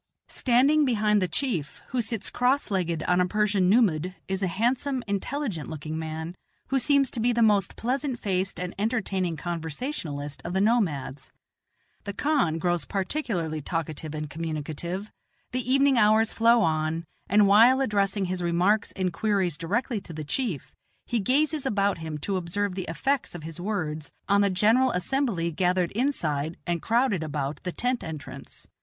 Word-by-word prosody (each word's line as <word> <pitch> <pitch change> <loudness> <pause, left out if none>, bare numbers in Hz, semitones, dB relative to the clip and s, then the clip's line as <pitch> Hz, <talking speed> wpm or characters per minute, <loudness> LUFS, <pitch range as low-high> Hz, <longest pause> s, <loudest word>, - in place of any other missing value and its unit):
Standing 275 +5 +3
behind 210 -5 +2
the 185 - +1
chief, 175 - -2
who 250 -1 0
sits 225 -2 -2
cross 250 0 +1
legged 170 -4 -1
on 180 0 +2
a 180 - +2
Persian 205 -2 +2
nummud, 185 -5 +2
is 190 0 -2
a 190 - +1
handsome, 250 +7 0
intelligent 205 - -3
looking 155 0 -5
man, 160 +1 -5 0.4
who 270 - +2
seems 275 +1 +3
to - - -3
be 240 +2 +3
the 235 -1 +2
most 205 -3 +3
pleasant 260 +2 -1
faced 190 -3 -1
and 180 0 -4
entertaining 195 -6 -1
conversationalist 160 - -4
of 175 - -4
the 190 - +1
nomads. 170 - 0 0.7
The 200 - -4
kahn 270 - +1
grows 175 -1 0
particularly 185 - -2
talkative 155 0 -4
and 150 0 -4
communicative, 160 +5 -4 0.4
the 255 +1 -2
evening 275 -2 +4
hours 220 +1 +4
flow 230 0 +4
on, 160 0 0 0.2
and 205 +1 +5
while 230 +6 +6
addressing 200 -5 +1
his 180 0 -3
remarks 180 +5 +2
and 185 -2 -1
queries 195 -4 +1
directly 210 - -2
to 175 - -10
the 155 0 -5
chief, 180 - -3 0.3
he 235 - 0
gazes 290 +7 +1
about 200 -7 +1
him 160 -2 -5
to 195 -2 0
observe 185 +3 -2
the 185 -1 -4
effects 265 +7 -1
of 165 - -7
his 165 +2 -7
words 160 -7 -3 0.2
on 200 0 +4
the 200 - +3
general 220 +7 +3
assembly 185 -4 0
gathered 180 +1 +1
inside 165 - -1
and 175 -2 -1
crowded 230 -5 +1
about 150 -2 -3
the 180 - -3
tent 250 +5 -1
entrance. 155 -4 -8
195 Hz, 160 wpm, -26 LUFS, 165-235 Hz, 0.7 s, while